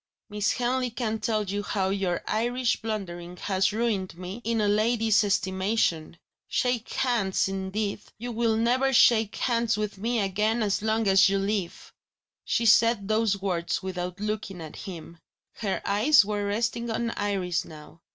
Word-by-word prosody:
Miss 210 0 0
Henley 250 +1 0
can 225 -2 -3
tell 215 -1 0
you 200 +1 -3
how 195 -2 -1
your 190 -3 -1
Irish 240 +2 0
blundering 180 -5 -5
has 190 0 0
ruined 210 -6 -1
me 185 +5 -7
in 230 0 0
a 210 - +2
lady's 220 +1 +3
estimation. 190 -4 0 0.3
Shake 245 -2 -1
hands, 230 -9 +1
indeed! 195 +2 -3 0.2
You 240 +3 -5
will 225 -1 +1
never 255 +4 +2
shake 225 -3 +4
hands 235 -3 0
with 210 -2 -3
Me 230 +3 0
again 210 +3 0
as 200 -1 0
long 220 0 0
as 195 +1 +6
you 195 - +1
live!" 195 -3 -3 0.5
She 235 - 0
said 225 -2 +4
those 215 -2 +1
words 175 -3 -2
without 180 0 -4
looking 210 -3 -4
at 160 -2 -8
him; 170 -2 -9 0.4
her 200 -4 -2
eyes 215 +5 +5
were 205 -1 -2
resting 230 +3 -1
on 230 +1 -1
Iris 190 -5 -1
now. 155 +1 -13
210 Hz, 155 wpm, -26 LUFS, 190-230 Hz, 0.5 s, as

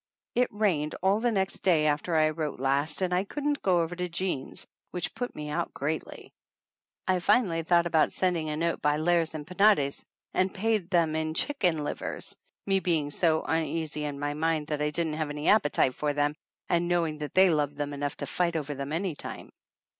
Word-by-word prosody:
It 250 +1 +2
rained 180 -8 0
all 195 +2 +3
the 240 +1 +1
next 190 -3 0
day 165 -5 +3
after 155 +3 0
I 155 0 +4
wrote 155 -3 -4
last 140 +6 +1
and 180 -1 0
I 180 +1 +2
couldn't 290 +7 -2
go 180 -3 +3
over 165 +2 -4
to 180 0 -3
Jean's, 170 -5 -3 0.2
which 180 -1 -3
put 245 +2 -4
me 150 0 -5
out 170 +3 -2
greatly. 155 +3 -4 0.7
I 185 -1 +2
finally 185 -3 +2
thought 170 +1 +3
about 160 -2 +3
send 180 -1 +1
ing 155 -2 -2
a 150 - -2
note 170 +1 -1
by 150 0 +2
Lares 165 0 +1
and 150 -1 -5
Penates 180 -6 +3 0.3
and 185 +1 +2
paid 210 -2 0
them 165 -4 +2
in 160 0 -2
chicken 180 - +1
livers, - - -4 0.3
me 195 -1 +2
being 160 -6 0
so 160 0 +2
uneasy 160 -1 -1
in 145 -1 -4
my 145 0 -1
mind 160 0 0
that 150 -1 -2
I 150 - +1
didn't 160 +1 0
have 155 - -1
any 150 +1 -1
appetite 145 -10 +3
for 150 +2 -1
them, 145 0 +1 0.3
and 175 0 +1
knowing 165 -3 0
that 150 -1 -6
they 190 -1 +6
loved 145 -2 0
them 145 0 -3
enough 145 0 -3
to - - -3
fight 175 -2 -1
over 150 -2 -2
them 140 +1 -5
any 170 +2 -1
time. - - -8
165 Hz, 205 wpm, -28 LUFS, 150-180 Hz, 0.7 s, they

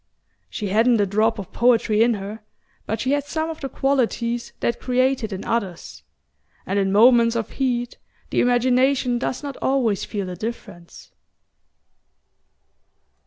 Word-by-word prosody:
She 210 -3 -4
hadn't 225 +3 +3
a 205 - +3
drop 215 +4 +1
of 200 -4 -8
poetry 230 -3 +3
in 235 0 +4
her, 205 +2 -7 0.5
but 220 - -2
she 260 - -1
had 285 0 +1
some 315 +2 -2
of 315 - -9
the 270 - -4
qualities 240 -4 -1
that 235 - -1
create 255 0 +1
it 215 - -4
in 190 0 -6
others; 195 -7 -3 0.6
and 195 +2 0
in 195 -1 +1
moments 230 +2 +5
of 230 -1 -3
heat 245 -3 -2 0.3
the - - +2
imagination 250 +1 +2
does 255 +2 -3
not 280 -2 -6
always 245 -7 0
feel 205 -3 -4
the 180 -1 -6
difference... 200 -4 -8
235 Hz, 150 wpm, -22 LUFS, 210-255 Hz, 0.6 s, moments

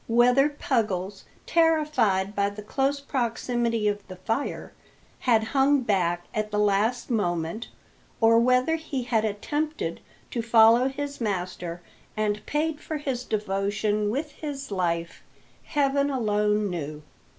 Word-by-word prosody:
Whether 245 +4 +4
Puggles, 205 -9 -2 0.2
terrified 300 - +2
by 200 -1 +1
the 205 +1 -9
close 275 +6 0
proximity 240 -4 -1
of 205 0 0
the 185 - -8
fire, 225 +9 -3 0.6
had 225 -2 +5
hung 275 0 +4
back 175 -6 0
at 215 0 -1
the 210 - -2
last 210 +5 +1
moment, 175 -1 -1 0.5
or 230 0 +5
whether 255 +6 +3
he 285 -5 -4
had 230 -3 +1
attempted 220 - -2 0.3
to 235 - -1
follow 230 +2 +6
his 280 0 -5
master 180 -4 -3 0.3
and 210 -1 0
paid 305 +1 -1
for 310 - -4
his 270 -4 -3
devotion 205 0 -1
with 290 +7 -2
his 280 -4 -6
life, 170 -3 -2 0.4
heaven 280 -1 +1
alone 210 -5 +1
knew. 150 -3 -5
225 Hz, 130 wpm, -26 LUFS, 205-270 Hz, 0.6 s, follow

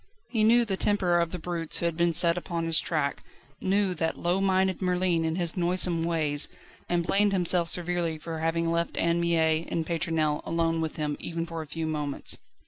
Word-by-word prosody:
He 225 -2 +1
knew 235 +2 +5
the 195 -3 -2
temper 185 -5 +2
of 170 -1 0
the 180 - -4
brutes 165 -1 -1
who - - -1
had 170 -1 0
been 170 +1 +2
set 170 +1 +4
upon 170 -1 -3
his 165 -1 +5
track, 150 -4 -2 0.4
knew 195 0 +1
that 165 -2 -2
low 175 +3 0
minded 190 -1 +1
Merlin 180 -2 +1
and 160 +1 -1
his 175 -2 -1
noisome 175 -1 +1
ways, 155 -4 +1 0.4
and 175 -1 0
blamed 200 +2 +2
himself 175 -2 +2
severely 175 -2 0
for 160 +1 -6
having 165 +1 0
left 170 0 -1
Anne 170 +1 +1
Mie 165 -1 +1
and 165 -1 -2
Pétronelle 160 -2 0
alone 165 0 0
with 160 -1 -3
him 150 -2 -2
even 165 0 -4
for 165 -1 -6
a 155 - -9
few 160 +2 -4
moments. 150 -3 -3
170 Hz, 200 wpm, -27 LUFS, 160-180 Hz, 0.4 s, knew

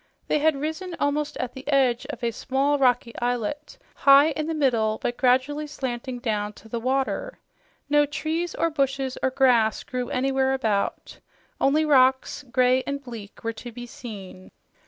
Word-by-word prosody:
They - - +2
had 310 0 +3
risen 320 +4 -4
almost 290 +1 -1
at 250 -1 -4
the 265 +1 -11
edge 265 -4 +2
of - - -7
a 235 - +1
small, 275 +5 0
rocky 245 -3 +2
islet, 245 - -3 0.2
high 280 +3 +6
in 310 0 -3
the 325 - -2
middle, 230 -7 +1
but 240 - -2
gradually 265 +5 +1
slanting 255 -3 -4
down 210 -4 -2
to 220 - -16
the 235 +1 -3
water. 270 - -1 0.5
No 295 0 +3
trees 320 +4 -3
or 330 - 0
bushes 270 -2 -1
or 265 - +2
grass 250 -4 +3
grew 250 -1 -4
anywhere 265 0 +1
about; 215 -6 -2 0.4
only 300 +3 +3
rocks, 265 -1 +3
gray 255 0 +3
and 280 0 -3
bleak, 225 -5 -10
were 230 0 -2
to 240 +2 -9
be 240 +1 -8
seen. 200 -6 -10
265 Hz, 165 wpm, -25 LUFS, 240-290 Hz, 0.5 s, high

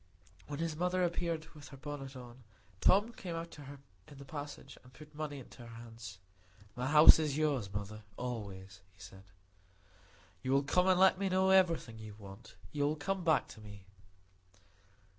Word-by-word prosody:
When 145 - -5
his 165 0 -2
mother 180 +2 +1
appeared 170 -2 -1
with 150 -2 -12
her 140 - -11
bonnet 140 -1 -7
on, 125 0 -11 0.4
Tom 205 - +4
came 175 -6 -6
out 165 0 -5
to 145 - -11
her 140 +1 -9 0.3
in 145 - -13
the 140 - -10
passage, 145 0 -8
and 125 - -17
put 150 +3 -14
money 150 -1 -5
into 130 - -12
her 120 - -10
hands. 115 -3 -10 0.6
"My 125 +1 -2
house 150 +2 +9
is 150 -3 -1
yours, 140 -10 0
mother, 105 +2 -5 0.2
always," 100 -6 -6
he - - -27
said. 95 +1 -12 1.2
"You 130 0 0
will 140 +1 +4
come 180 +6 +2
and 185 -1 +4
let 190 0 +6
me 195 -1 0
know 190 +1 +3
everything 170 -12 +3
you 110 -1 -9
want; 100 +2 -12 0.2
you 145 -1 0
will 150 - 0
come 185 +5 -2
back 160 -2 +3
to 110 - -12
me." 100 -2 -12
145 Hz, 180 wpm, -34 LUFS, 115-165 Hz, 1.2 s, house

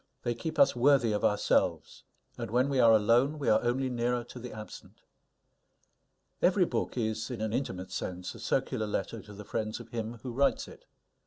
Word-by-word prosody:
They 120 - 0
keep 155 +7 -5
us - - +5
worthy 125 -2 +4
of 105 - -1
ourselves; 105 0 +1 0.3
and 115 -2 -5
when 125 +5 +2
we 135 -2 +1
are 115 -2 +7
alone, 115 +7 +4
we 145 - -1
are - - +4
only 125 +2 0
nearer 120 0 -1
to 125 +1 -11
the 125 0 -7
absent. 110 0 -11 1.4
Every - - +4
book - - -3
is, 110 -1 -2
in 125 -3 -5
an 110 0 -2
intimate 95 -8 -3
sense, 90 -1 -4
a 115 - -12
circular 115 -1 -1
letter 105 +2 -3
to 105 - -13
the 105 +1 -9
friends 110 +1 -3
of - - -11
him 115 0 -4
who 125 - -4
writes 140 +4 +1
it. - - -14
115 Hz, 190 wpm, -30 LUFS, 110-125 Hz, 1.4 s, are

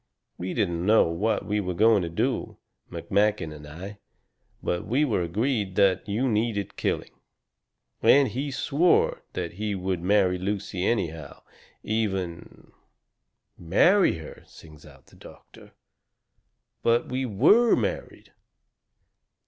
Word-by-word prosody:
We 90 +1 -4
didn't 85 -3 -1
know 110 +4 +5
what 100 +7 -1
we 105 0 -1
were 90 -3 -3
going 110 +1 +4
to 85 - -3
do, 85 - -2 0.3
McMakin 100 -5 0
and 75 -1 -11
I, 95 +7 -9 0.6
but 85 - -2
we 135 +7 +2
were 115 -9 0
both - - -12
agreed 105 -1 -1
that 100 0 +2
you 115 +6 0
needed 110 -3 -1
killing. - - -2 0.9
And 140 -1 +5
he 140 +4 -4
swore 145 +5 +1
that 90 -2 -4
he 105 +2 -3
would 95 -2 -3
marry 95 -1 +2
Lucy 100 -1 -3
anyhow, 85 -9 -3 0.4
even 95 -6 -4 0.4
" - - -54 0.2
"MARRY 185 - +5
HER!" 80 - -11
sings 75 -2 -16
out 70 -3 -18
the - - -21
doctor, - - -16 1.1
"but 115 +1 +2
we 130 +1 -2
WERE 215 - +4
married." - - -4
100 Hz, 130 wpm, -25 LUFS, 90-115 Hz, 1.1 s, know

